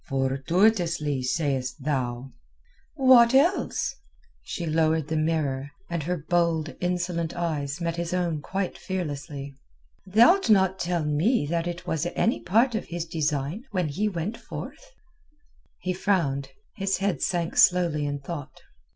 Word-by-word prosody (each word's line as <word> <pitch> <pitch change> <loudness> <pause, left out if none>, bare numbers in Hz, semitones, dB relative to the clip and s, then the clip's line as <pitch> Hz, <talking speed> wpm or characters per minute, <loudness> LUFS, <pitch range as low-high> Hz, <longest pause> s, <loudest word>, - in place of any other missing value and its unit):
"Fortuitously, 150 +3 +1
sayest 130 -2 -1
thou?" 130 -3 -2 0.6
"What 255 -3 +6
else?" 330 +8 +2 0.5
She 170 - -5
lowered 160 -1 +1
the 160 - -1
mirror, 155 -4 0 0.2
and 170 -1 -1
her 175 +4 -2
bold, 165 0 0
insolent 175 -2 -1
eyes 155 -3 -2
met 170 -1 -2
his 170 0 -3
own 175 -4 -1
quite 190 +4 -3
fearlessly. 145 -6 -5 0.5
"Thou'lt 235 - +5
not 190 -2 +4
tell 175 -3 -1
me 150 - +2
that 170 0 0
it 175 0 -5
was 160 +2 -1
any 225 - +1
part 230 +6 +3
of 220 - -2
his 170 -1 -4
design 155 - -2
when 180 -7 -1
he 205 +9 0
went 195 +4 -4
forth?" - - -9 0.9
He 185 0 -1
frowned; 155 -8 0 0.3
his 195 0 0
head 195 -7 -1
sank 170 -2 -1
slowly 170 -5 +4
in 145 0 -3
thought. 145 -1 -7
170 Hz, 135 wpm, -26 LUFS, 145-185 Hz, 0.9 s, What